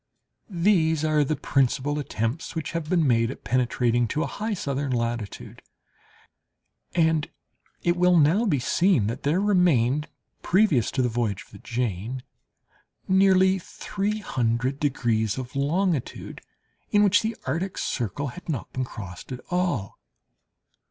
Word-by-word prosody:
These 170 -4 +2
are 155 -1 +3
the 150 +2 -1
principal 135 +2 0
attempts 125 +4 -3
which 160 - -3
have 165 -2 -4
been 175 -3 +3
made 115 -3 +3
at 135 - -8
penetrating 120 -1 +1
to 155 +7 -1
a - - -1
high 215 0 -3
southern 140 -5 -2
latitude, 115 -3 -3 1.3
and 160 -2 +2 0.5
it 175 0 +2
will 180 0 +4
now 170 +10 +4
be 150 - +2
seen 160 - +2
that 115 +4 -3
there 150 +6 +1
remained, 155 - +2 0.3
previous 175 - +3
to 130 - 0
the - - +2
voyage 110 -5 -2
of - - -25
the 100 - -12
Jane, 120 +1 -3 0.8
nearly 190 0 +4
three 200 +4 -3
hundred 125 - -1
degrees 115 -7 0
of 130 0 -6
longitude 155 +1 -1 0.5
in 205 0 +4
which 205 -1 +4
the 220 0 -2
Antarctic 170 +8 -3
circle 130 +5 -2
had 175 +7 -11
not 140 -7 -4
been 130 - -1
crossed 100 -4 -8
at 125 -1 -5
all. 175 - -1
145 Hz, 140 wpm, -25 LUFS, 120-180 Hz, 1.3 s, will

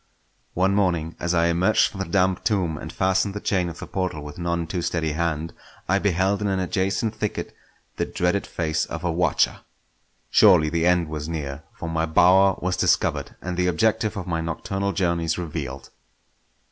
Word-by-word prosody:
One 95 +2 +2
morning 85 -5 0
as 85 +1 0
I 85 0 +3
emerged 85 +5 +3
from 95 - -9
the 95 - -2
damp 95 +1 +1
tomb 95 -7 0
and - - -7
fastened 95 +2 +1
the - - -2
chain 90 -4 0
of 85 - -9
the - - -7
portal 90 -6 -3
with 75 +2 -9
none 85 -1 -1
too 85 +2 -3
steady 80 -2 -1
hand, 80 0 -2 0.3
I 95 +2 +2
beheld 95 +1 +1
in 105 - 0
an 95 -1 0
adjacent 95 +3 -1
thicket 105 -2 -4 0.4
the - - -1
dreaded 90 +3 0
face 80 -1 -1
of 85 0 -6
a 90 - 0
watcher. 85 -2 +1 0.7
Surely 90 -8 +6
the 85 0 +1
end 90 -2 +3
was 75 0 -5
near; 75 -2 -5
for 85 - -6
my 80 0 -1
bower 95 +4 +5
was 90 +1 -1
discovered, - - +1
and 90 0 -4
the 90 0 +2
objective 110 +5 +1
of 95 - -4
my 85 -3 -2
nocturnal 95 +4 -2
journeys 85 -3 0
revealed. 75 -6 -5
90 Hz, 185 wpm, -24 LUFS, 80-95 Hz, 0.7 s, Surely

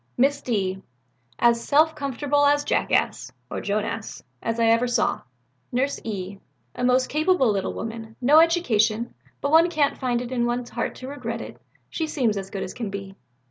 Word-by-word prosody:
"Miss 275 +3 +2
D. 190 -5 -1 0.6
As 235 -1 +3
self 310 +2 +4
comfortable 285 0 0
a 285 0 +5
jackass - - 0 0.2
(or - - -3
Joan 205 +1 0
ass) 225 -1 -6 0.2
as 230 0 -2
ever 230 +1 +4
I - - -2
saw." 240 -2 +1 0.5
"Nurse 265 +3 0
E. 195 -2 -5 0.3
A - - -5
most 255 +1 +3
capable 310 - +2
little 195 -2 -2
woman, 225 0 -6
no 280 +5 +6
education, 235 -10 +2 0.3
but 280 - -1
one 330 +2 +6
can't 305 -4 +1
find 245 -3 0
it 245 0 -6
in 240 -2 +1
one's 240 0 -3
heart - - -3
to 255 - -8
regret 240 -5 -5
it, - - -9 0.3
she 320 - -3
seems 250 -8 0
as 195 -1 -5
good 195 -1 -4
as - - -6
can 230 -4 -4
be." 195 -1 -7
240 Hz, 180 wpm, -24 LUFS, 220-285 Hz, 0.6 s, no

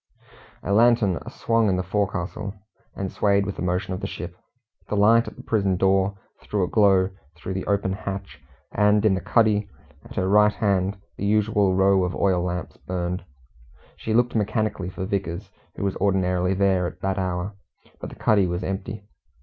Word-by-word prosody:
A 100 - -1
lantern 110 -5 +4
swung 115 -2 +1
in 95 - +1
the 90 - -1
forecastle, 100 +1 -2 0.4
and 95 -1 -4
swayed 100 -1 +2
with 100 - -5
the - - -5
motion 90 +1 -1
of 90 - -4
the - - -2
ship. 85 0 -7 0.5
The - - -1
light 115 +3 +5
at - - -8
the - - -11
prison 100 -4 +1
door 95 +1 +2 0.2
threw 105 -2 -1
a - - 0
glow 95 -3 +3 0.2
through 90 +2 -6
the 95 - -4
open 100 -1 +1
hatch, 100 -1 -6 0.3
and 105 +1 +3
in 105 - +5
the 95 - -1
cuddy, 105 -3 +2 0.3
at - - -13
her 95 - 0
right 105 +1 +5
hand, 100 -1 0 0.2
the 100 - -3
usual 105 -2 +2
row 95 0 +4
of 90 0 -2
oil 95 -3 +2
lamps 90 -1 -4
burned. 90 0 -3 0.7
She 110 - -2
looked 120 +1 +3
mechanically 110 -3 -1
for 95 0 -5
Vickers, 95 -1 -3 0.2
who - - -5
was 100 -1 -1
ordinarily 90 -1 +1
there 95 -2 +2
at - - -10
that 95 0 -1
hour, 95 +2 -2 0.5
but - - -6
the - - -11
cuddy 100 -4 +3
was 90 +1 -3
empty. 95 +2 -4
95 Hz, 180 wpm, -24 LUFS, 95-105 Hz, 0.7 s, light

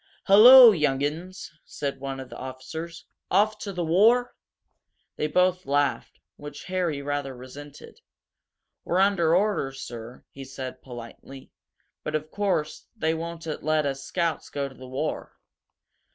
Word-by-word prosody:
"Hullo, 235 +5 +10
young 150 -7 0
'uns!" 170 +6 -5
said 140 -2 -5
one 135 0 -5
of 130 -2 -9
the - - -8
officers. 130 +6 -8 0.2
"Off 210 +3 +2
to 200 - -5
the 175 -2 -3
war?" 225 +9 +3 0.8
They 150 - -1
both 180 +2 +1
laughed, 145 0 -1 0.2
which 145 0 -9
Harry 175 -6 -2
rather 145 -2 -3
resented. 140 +3 -12 0.8
"We're 175 - -1
under 185 -4 +3
orders, 180 -9 0
sir," 120 +1 -9
he 135 - -10
said, 130 -1 -8
politely. 125 +2 -11 0.5
"But, - - -3
of 155 0 -4
course, 190 -7 -2
they 160 -7 0
won't 165 0 -6 0.2
let 155 0 +1
us 135 -1 -3
Scouts 170 +1 -2
go 140 -1 -3
to 135 - -13
the 130 0 -12
war." 135 +4 -4
155 Hz, 140 wpm, -25 LUFS, 135-180 Hz, 0.8 s, Hullo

